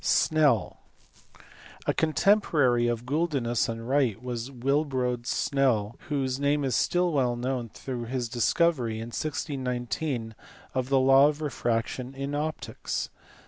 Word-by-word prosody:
Snell. 145 - +2 1.1
A - - +2
contemporary 155 - +3
of 120 0 -2
Guldinus 135 -6 0
and 115 0 -5
Wright 130 -6 +2
was 120 0 -5
Willebrod 130 -2 -1
Snell, 120 -8 +1
whose 135 -3 -1
name 145 +1 +1
is 130 -4 0
still 175 0 +2
well 125 -4 +2
known 125 -1 -2
through 120 +1 -6
his 125 0 -2
discovery 125 0 +1
in 115 +1 -5
1619 130 -4 -3 0.4
of 130 0 -1
the 135 - +4
law 135 +2 +6
of 150 0 -2
refraction 125 -2 -2
in 140 +1 -4
optics. 155 +2 -3
130 Hz, 125 wpm, -27 LUFS, 120-145 Hz, 1.1 s, law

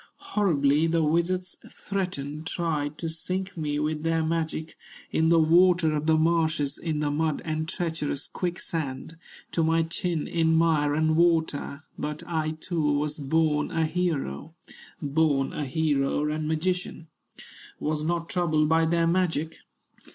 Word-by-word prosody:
"Horribly 155 -6 +3
the 165 0 +2
wizards 175 +4 0
threatened, 160 -6 -4
Tried 155 -4 -2
to 165 - -4
sink 185 +4 -4
me 150 -3 -2
with 150 +1 -1
their 165 0 +1
magic, 160 -1 -2 0.4
In 160 0 +2
the 165 0 +5
water 170 0 +4
of 150 +1 -2
the 160 0 +5
marshes, 160 -3 +1
In 155 -3 -2
the 145 -1 0
mud 155 0 0
and 155 0 -2
treacherous 160 -4 -2
quicksand, 165 -5 -4 0.4
To 165 - +1
my 165 +1 +3
chin 165 0 -2
in 160 -1 +2
mire 155 -3 +3
and 155 0 +2
water; 160 -3 +1 0.2
But 150 0 -4
I 160 -2 -2
too 170 0 -2
was 150 +1 -1
born 150 +1 +1
a 165 -1 0
hero, 160 - -2 0.5
Born 145 -2 +1
a 150 - -3
hero 145 0 +1
and 155 0 -2
magician, 165 +1 -2 0.7
Was 155 0 -1
not 170 +1 -1
troubled 155 -4 +1
by 160 +1 +3
their 170 +1 +2
magic. 165 -2 0
160 Hz, 145 wpm, -26 LUFS, 150-170 Hz, 0.7 s, the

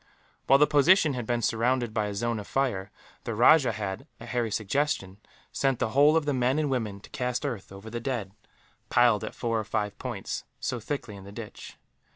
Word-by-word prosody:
While 135 - +7
the 150 - +6
position 150 +2 +4
had 125 -3 -4
been 120 -1 0
surrounded 120 +1 +1
by 105 -2 0
a 100 - -5
zone 115 +1 -1
of 105 - -8
fire, 105 -8 -1 0.3
the 115 - -3
rajah 125 +1 +6
had, 105 +6 -5
at - - -10
Harry's 120 -4 -1
suggestion, 105 -4 -1 0.3
sent 135 -2 +1
the 110 - 0
whole 145 +6 +5
of 160 - 0
the 145 - +1
men 130 +2 +1
and 150 -3 0
women 110 -6 -2
to - - -14
cast 125 +2 -2
earth 120 -10 -4
over 100 +3 -10
the 120 - -3
dead; 115 -6 -3 0.6
piled, 120 -4 +4
at - - -6
four 115 -2 -1
or - - -2
five 105 -1 -2
points, - - -4 0.2
so 125 -2 -2
thickly 115 -2 -5
in 100 - -11
the 100 - -11
ditch. 110 0 -9
120 Hz, 205 wpm, -27 LUFS, 105-135 Hz, 0.6 s, While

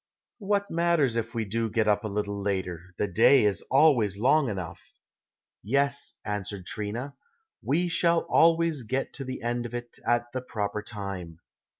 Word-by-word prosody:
What 200 -1 0
matters 165 -7 +2
if 115 +1 -3
we 115 -1 -1
do 115 +3 -1
get 110 0 +1
up 105 0 +2
a - - -2
little 100 0 -3
later 95 -3 -3
the 105 - 0
day 115 +6 +5
is 100 -3 +1
always 125 -9 +4
long 135 +4 +3
enough." 95 -5 -7 0.7
"Yes," 140 +6 0
answered 100 -2 -4
Trina, 115 +5 -4 0.5
"we 170 +6 +1
shall 170 0 +2
always 165 -3 +3
get 130 +4 -3
to 135 - -5
the 130 -2 -6
end 120 0 -1
of 120 - -8
it 120 -1 -7
at 120 0 0
the 130 - -3
proper 105 -4 -3
time. 100 -6 -7
115 Hz, 165 wpm, -27 LUFS, 105-140 Hz, 0.7 s, day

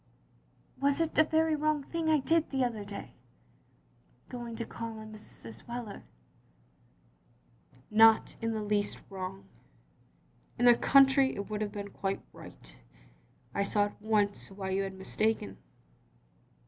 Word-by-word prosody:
" - - -33
"Was 280 +2 +2
it 330 -1 0
a - - +9
very 315 0 +2
wrong 305 -1 0
thing 325 +2 -2
I 310 - +5
did 325 +3 +1
the 265 -2 0
other 230 -4 -2
day, 200 0 -8 1.2
going 240 -2 -6
to 230 - -4
call 230 -1 -6
on 215 0 -9
Mrs. 115 - -9
Wheler?" 235 -4 -6 1.9
"Not 225 +1 +6
in 225 0 0
the 215 -1 -2
least 205 0 0
wrong. 190 0 -6 1.1
In 245 - +2
the 240 - +9
cotintry 270 +1 +5
it 200 +1 -6
would 210 0 -2
have 210 -1 -2
been 200 -1 -6
quite 195 0 -3
right. - - -13 0.8
I - - 0
saw 205 +1 +2
at 205 - -9
once 210 -2 0
why 190 -1 -5
you 195 +1 +1
had 195 -1 -4
mistaken. 190 - -1
220 Hz, 145 wpm, -31 LUFS, 200-265 Hz, 1.9 s, a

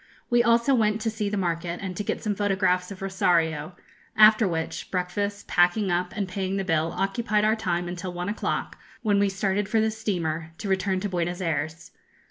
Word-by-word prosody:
We 240 0 +5
also 235 +3 +3
went 215 -3 +2
to 225 0 0
see 215 -2 -2
the 205 - -2
market, 170 -1 -2
and 190 -2 -5
to 210 - -3
get - - -3
some 210 - 0
photographs 190 -3 +1
of 195 -1 -8
Rosario; 175 -4 +1 0.4
after 215 0 +7
which, 165 -2 -3
breakfast, 200 +3 -2
packing 180 +3 +3
up, 180 +1 0
and 200 -3 -2
paying 190 +1 -2
the 195 - -1
bill 165 -2 +1
occupied 210 +2 +1
our 215 +1 +3
time 175 -5 -1
until 180 +1 -5
one 175 0 -4
o'clock, 205 - -3 0.2
when 205 -3 +3
we 200 0 +3
started 195 +1 -1
for 225 - +2
the 220 0 +2
steamer, 165 -7 -3
to 205 - -6
return 190 0 +1
to 205 - -2
Buenos 175 0 -2
Ayres. 160 -1 -3
190 Hz, 195 wpm, -26 LUFS, 175-210 Hz, 0.4 s, after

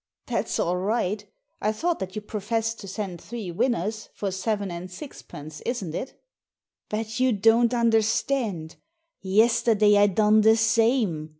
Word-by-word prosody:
" - - -62
That's - - -1
all 175 +1 0
right 205 +1 -1 0.4
I 215 - +1
thought 330 +10 -1
that 190 0 -5
you 215 - -4
professed 225 +2 -2
to 200 - -9
send 190 -3 -5
three 220 -6 -6
winners, 215 +2 -1
for 200 -2 -3
seven 200 0 -2
and 175 +2 -6
sixpence, 155 - -10
isn't 205 -10 -3
it? 260 - -6 0.3
" - - -62
"But 220 +2 -3
you 255 0 +3
don't 225 +3 +4
understand. 225 -5 0 0.4
Yesterday 215 +1 +4
I 205 - +6
done 210 +2 +4
the 220 +1 +5
same. 225 - +2
215 Hz, 155 wpm, -25 LUFS, 190-230 Hz, 0.4 s, I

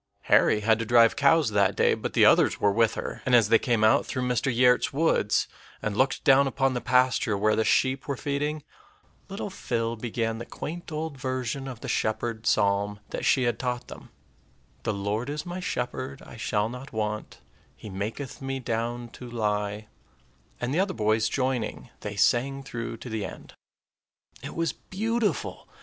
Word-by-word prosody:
Harry 105 - +4
had 110 +1 +3
to - - -1
drive 115 0 +5
cows 145 -2 +4
that 100 -2 +2
day; - - +3
but - - -4
the - - +5
others - - +4
were 100 - +3
with 115 +1 +2
her, - - -5
and 125 - +3
as 115 -3 +5
they 115 - +6
came 115 -3 +1
out 110 - +5
through 130 - -3
Mr. 125 +2 +1
Giertz's 125 +1 +3
woods, 140 -8 +2 0.3
and 105 -1 -3
looked 130 +4 +1
down 135 +1 +5
upon 135 0 +1
the 125 - -2
pasture 125 -4 +2
where 105 +1 +2
the 110 - +2
sheep 130 +4 +1
were 140 -2 -2
feeding, 145 +2 -2 0.7
little 195 +1 -5
Phil 115 -10 -2
began 115 0 -2
the 120 - -6
quaint 170 +2 -7
old 155 -2 -4
version 130 0 -3
of 125 -3 -8
the - - -6
shepherd 110 +1 -1
psalm 100 0 +2
that - - -3
she 130 - +3
had 120 -1 0
taught 125 -1 -3
them, - - -11 0.7
"The 110 - -1
Lord 105 +6 -2
is 150 +1 -4
my 175 +1 -5
shepherd; 130 -3 -4
I - - -12
shall 105 -2 0
not 125 +4 -8
want; 105 -1 -4 0.4
He - - -11
maketh 110 +10 -5
me 135 0 -3
down 120 0 -3
to 125 +1 -10
lie," 105 -2 -2 0.7
and, 120 +2 -2
the 165 - +1
other 190 0 0
boys 110 0 +2
joining, 130 -2 -2
they 105 0 -6
sang 135 +7 +2
through 115 -3 -5
to 120 - -9
the 110 -2 -3
end. - - -9 0.9
It - - -7
was 165 -1 0
beautiful. 215 - -2
120 Hz, 180 wpm, -27 LUFS, 110-135 Hz, 0.9 s, they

